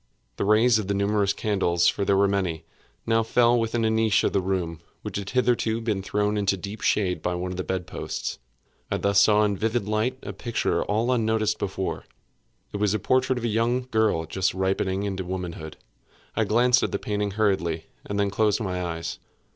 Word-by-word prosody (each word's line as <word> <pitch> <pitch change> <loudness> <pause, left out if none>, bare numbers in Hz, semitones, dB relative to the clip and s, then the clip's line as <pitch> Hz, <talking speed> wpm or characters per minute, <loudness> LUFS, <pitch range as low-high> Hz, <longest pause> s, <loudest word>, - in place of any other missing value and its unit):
The - - -1
rays 110 +2 +4
of 105 - -4
the 100 - 0
numerous 100 0 +1
candles 85 -5 +1
(for 100 - +1
there 100 0 +2
were 100 0 +4
many) 90 -5 -1 0.4
now 115 0 +3
fell 120 +1 +3
within 115 0 0
a - - +3
niche 110 -1 +2
of - - +1
the 100 - +2
room 90 -3 -2 0.2
which 105 -3 -4
had 100 0 -5
hitherto 120 -3 +1
been 110 -4 -1
thrown 105 +2 0
into 100 -1 +1
deep 100 +4 -7
shade 95 -4 +1
by 90 - -1
one 90 +1 -3
of 90 - -6
the 95 - -2
bed 95 -1 -3
posts. - - -5 0.5
I - - 0
thus 100 0 +3
saw 105 0 +5
in 105 -1 +1
vivid 110 +1 -1
light 110 +4 0
a - - -6
picture 115 -2 -1
all 110 +4 0
unnoticed 110 -3 +1
before. 95 -1 -3 0.7
It - - -2
was 105 -1 +1
the - - +2
portrait 130 +4 +1
of 120 - -4
a - - +1
young 120 +3 0
girl 110 -7 +2
just 95 +4 -1
ripening 95 +1 0
into 95 -2 -3
womanhood. 90 -4 -6 0.6
I 110 - +2
glanced 120 +4 +4
at - - -1
the - - 0
painting 105 -1 -2
hurriedly, 95 -6 0 0.2
and 100 0 -3
then 100 -1 +1
closed 105 +1 +2
my 90 -4 -2
eyes. 80 -1 -4
105 Hz, 200 wpm, -25 LUFS, 95-110 Hz, 0.7 s, saw